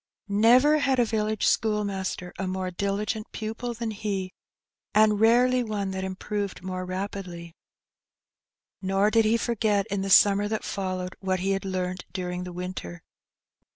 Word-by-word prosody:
Never 245 +9 +5
had 270 -2 +2
a 245 - +4
village 215 -1 -1
school 210 -2 +2
master 190 -2 -4
a 190 - -2
more 185 0 -2
diligent 200 +3 -2
pupil 225 +2 -4
than 230 -1 -3
he, 200 -3 -3 0.6
and 215 -1 +5
rarely 245 +3 +4
one 205 -3 -3
that 190 0 -4
improved 195 0 -4
moi'e 185 0 -4
rapidly. 185 -3 -5 1.3
Nor 195 +2 +2
did 225 0 +4
he 225 +2 +3
forget 215 -4 +1
in 200 -1 0
the 195 - -3
summer 200 +1 +6
that 215 0 -2
followed 185 -2 -3
what 190 -1 -1
he 195 +1 0
had 195 0 -1
learnt 185 -1 -3
during 180 -1 -3
the 180 - -6
winter. 175 - -6
200 Hz, 155 wpm, -26 LUFS, 185-215 Hz, 1.3 s, summer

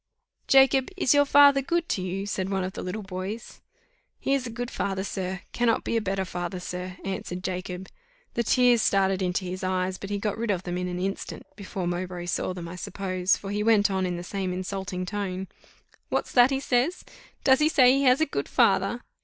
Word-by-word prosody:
"Jacob, 270 -1 +5
is 280 -8 +3
your 285 0 +5
father 280 -1 +6
good 340 +5 -1
to 190 - -1
you?" 185 +2 -3
said 190 -2 -2
one 195 -1 0
of 185 +1 -4
the - - -6
little 200 +4 -4
boys. 190 +4 -6 0.6
"He 275 - 0
is 265 -2 0
a - - -5
good 245 +2 -5
father, 190 -1 -2
sir 190 -1 -4
cannot 235 -2 +1
be - - -2
a 225 - +2
better 195 -1 -1
father, 175 0 -4
sir," 180 +1 -6
answered 185 -1 -4
Jacob: 185 0 -4 0.5
the 235 - 0
tears 245 0 +4
started 195 -1 +2
into 185 +1 -1
his 185 +1 -5
eyes, 185 0 -1
but 195 - -7
he 205 - -1
got 210 +1 -2
rid 230 -1 -2
of 190 -3 0
them 180 0 -3
in 180 - -2
an 180 0 -4
instant, 195 +2 -4
before 190 -2 -5
Mowbray 175 0 -3
saw 175 - -1
them, 175 -2 -6
I 175 +2 -8
suppose, 185 +1 0
for 195 - -7
he 205 +1 -1
went 210 -2 +4
on 190 -1 0
in 175 -1 -3
the 175 - -6
same 190 0 -3
insulting 185 0 -4
tone. 190 -1 -3 0.6
"What's - - -1
that 245 0 +6
he 270 -1 0
says? 270 +6 0 0.4
Does 265 -1 +5
he 305 +1 +4
say 255 -5 +6
he 275 +1 +2
has 255 +3 +5
a - - +5
good 140 - -4
father? 195 +4 +2
195 Hz, 215 wpm, -26 LUFS, 185-235 Hz, 0.6 s, father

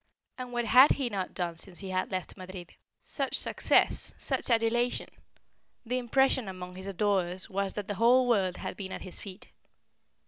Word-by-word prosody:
And 250 -1 -6
what 240 -1 -1
had 255 +5 +7
he 265 -4 -2
not 195 -4 -4
done 170 -2 -3
since 180 +1 -8
he 195 -1 -7
had 185 0 -1
left 185 -2 -4
Madrid? 185 -2 -9 0.3
Such 275 -2 -2
success - - +1
such - - -1
adulation! 240 +1 +1 0.8
The 250 +2 -1
impression 260 -1 +2
among 180 -1 -7
his 190 +1 -8
adorers 190 -1 -1
was 195 0 -1
that 205 -2 -5
the 205 - -2
whole 250 +2 +5
world 195 -6 +2
had - - -5
been 190 -2 -6
at - - -6
his 185 - -5
feet. 195 -2 -10
200 Hz, 175 wpm, -29 LUFS, 185-240 Hz, 0.8 s, had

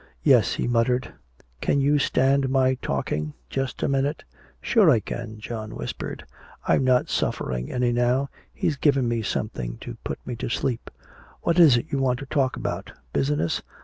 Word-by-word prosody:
"Yes," - - +5
he - - -1
muttered. 120 +1 +1 0.5
"Can 140 - +2
you 145 +2 +3
stand 135 0 +2
my 130 -1 +3
talking, 75 0 -2 0.2
just 135 -1 -2
a - - +2
minute?" 140 +2 0 0.4
"Sure 215 -8 +4
I 120 -7 +5
can," 115 0 -6
John 110 0 -6
whispered. - - -5 0.4
"I'm - - +3
not 130 -1 +3
suffering 60 -1 -2
any 125 -1 +1
now. 125 +3 +2 0.2
He's 150 - -1
given 140 -4 +3
me 115 -1 0
something 65 - -3
to - - -7
put - - -3
me 125 - -4
to - - -4
sleep. 125 0 -2 0.5
What 170 +1 +2
is 150 -8 +8
it 120 - -2
you 140 - 0
want 130 -2 +2
to 140 - -7
talk 135 -2 0
about? - - -4 0.2
Business?" 75 +4 0
125 Hz, 170 wpm, -25 LUFS, 115-140 Hz, 0.5 s, is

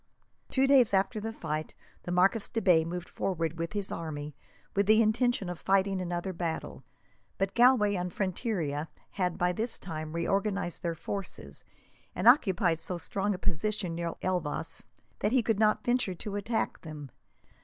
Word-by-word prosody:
Two 265 0 +3
days 260 -7 +5
after 195 +3 +1
the 225 +1 -4
fight, 155 -7 -4 0.3
the 175 - -5
Marquis 195 +5 +3
de 225 - 0
Bay 180 -6 +5
moved 175 +2 -5
forward 165 -3 -2
with 165 +3 -3
his 205 -2 -2
army, 150 -3 -5 0.4
with 200 0 +2
the 215 +1 +6
intention 225 -1 +2
of 175 -2 -5
fighting 195 0 +2
another 175 +1 -3
battle; 160 - -4 0.5
but 195 0 0
Galway 240 -4 +5
and 180 -2 -2
Frontiera 175 - -2 0.2
had, 180 -3 -1
by 180 0 +2
this 225 +6 -3
time, 155 -3 -6
reorganized 195 +1 -1
their 170 -1 -2
forces, 195 +3 -5 0.5
and - - 0
occupied 190 - +5
so 180 +2 -3
strong 195 +4 -1
a - - -6
position, 190 +1 -1
near 170 0 -3
Elvas, 175 -4 -2 0.3
that 210 +3 +1
he 255 -3 +4
could 220 -2 +1
not 215 -1 +3
venture 240 -6 +1
to 205 +3 -5
attack 220 +3 -1
them. 150 -5 -8
190 Hz, 165 wpm, -30 LUFS, 170-210 Hz, 0.5 s, the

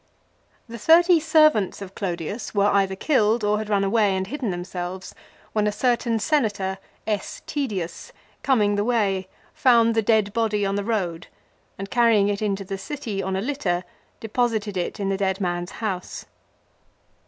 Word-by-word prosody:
The 235 0 -8
thirty 340 - +6
servants 310 - +3
of 195 -1 -9
Clodius 195 +3 -4
were 200 0 +3
either 195 -1 +2
killed 225 -2 +2
or 210 0 +2
had 215 -1 -5
run 200 -2 +2
away 200 -1 +2
and 190 - -2
hidden 265 0 -4
themselves, 180 +1 -5 0.4
when 210 -1 +1
a - - +1
certain 235 +1 +1
senator, 205 -7 0 0.3
S. 210 -3 -3
Tedius, 205 - -4 0.3
.coming 215 -7 +2
the 205 - +1
way, 205 -5 0 0.3
found 230 -3 +4
the 225 - +2
dead 215 -2 +2
body 215 -3 0
on 195 - -1
the 200 0 -1
road 185 -7 -2 0.5
and 195 +1 -7
carrying 230 -4 +4
it 205 0 -2
into 200 -2 -1
the 195 0 -5
city 235 -7 -4
on 190 0 -2
a 190 - -1
litter 205 -9 -1 0.4
deposited 220 -2 -1
it 180 +2 -3
in 195 -1 -1
the 195 - 0
dead 190 0 -1
man's 175 -2 -2 0.2
house. 185 -4 -4
205 Hz, 165 wpm, -23 LUFS, 195-230 Hz, 0.5 s, thirty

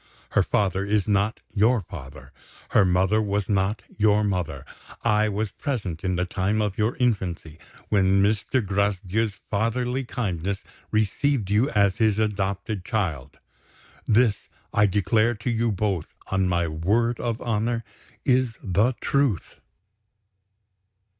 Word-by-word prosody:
Her - - +4
father 95 -2 +1
is 100 -1 0
not 105 +1 +1
your 115 +3 +3
father; 70 -10 -10 0.4
her 105 - +5
mother 95 +4 +2
was 100 -2 -1
not 100 +1 0
your 105 0 +4
mother. 90 -5 -2 0.4
I 110 -1 +3
was 105 +1 -2
present, 100 - -4
in 95 -1 0
the 90 +1 0
time 95 +3 -1
of 105 -2 0
your 110 +3 0
infancy, 90 -9 -1 0.3
when 95 -1 +3
Mr. 110 +3 +1
Gracedieu's 100 +2 0 0.2
fatherly 120 +5 0
kindness 100 -6 -3 0.3
received 110 +1 0
you 110 +7 +3
as 100 -5 +2
his 110 -3 +2
adopted 100 -1 -1
child. 90 - -2 0.7
This, 110 -1 +2 0.2
I 105 0 +4
declare 110 +4 +2
to 110 +3 -3
you 115 0 +1
both, 95 -4 -1 0.2
on 95 -1 +2
my 85 -1 +1
word 105 +10 0
of 115 -2 -2
honor, 115 +1 -1 0.4
is 125 -3 +2
the 105 +5 +2
truth." 140 - 0
105 Hz, 130 wpm, -25 LUFS, 95-110 Hz, 0.7 s, her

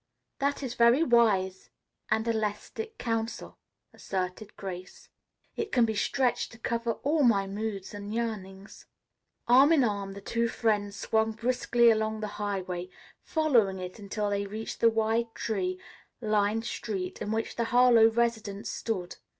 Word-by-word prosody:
"That 280 +1 0
is 250 -3 -3
very 235 +6 +5
wise 200 - +2 0.4
and 220 +1 +1
elastic 225 - -3
counsel," 225 -1 -3 0.3
asserted 190 +2 -4
Grace. 185 -2 -8 0.5
"It 435 -2 -3
can 240 -2 +4
be 220 - -1
stretched 250 +4 0
to - - -12
cover 235 0 -1
all 300 +3 +2
my 215 -7 +4
moods 200 0 -5
and 205 0 -7
yearnings." 210 -4 -5 0.6
Arm 265 +5 +7
in 305 -5 +5
arm, 200 -3 -2
the 200 - -8
two 235 +3 0
friends 210 -3 0
swung 220 +1 0
briskly 235 0 +3
along 220 0 -1
the 210 0 -5
highway, 185 -3 -3 0.3
following 245 - +2
it 185 +2 -7
until 205 0 -3
they 200 0 -1
reached 215 +2 -6
the 230 - +6
wide 225 +1 0
tree 185 -4 -2 0.4
lined 215 0 +1
street 195 -6 -4
in 205 - -3
which 225 +1 -2
the 235 - 0
Harlowe 240 -2 +6
residence 225 -3 -1
stood. 185 -6 -4
220 Hz, 145 wpm, -28 LUFS, 200-235 Hz, 0.6 s, Arm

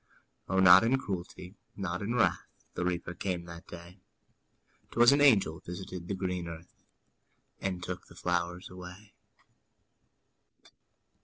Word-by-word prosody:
O, 95 - +2
not 90 +2 +9
in 125 +4 +3
cruelty, 90 -4 -6 0.2
not 90 -2 -3
in 110 +4 -2
wrath, 120 - +2 0.3
The - - -3
Reaper 90 -1 -2
came 90 -1 -3
that 85 0 -11
day; 85 +2 -11 0.9
'Twas 120 +2 +6
an 140 +1 +3
angel 100 - +4
visited 90 0 -7
the 100 - -2
green 90 -2 -3
earth, 85 0 -10 0.9
And 90 -2 -3
took 90 -1 -6
the - - -16
flowers 90 0 -2
away. 90 +3 -11
90 Hz, 130 wpm, -30 LUFS, 85-100 Hz, 0.9 s, not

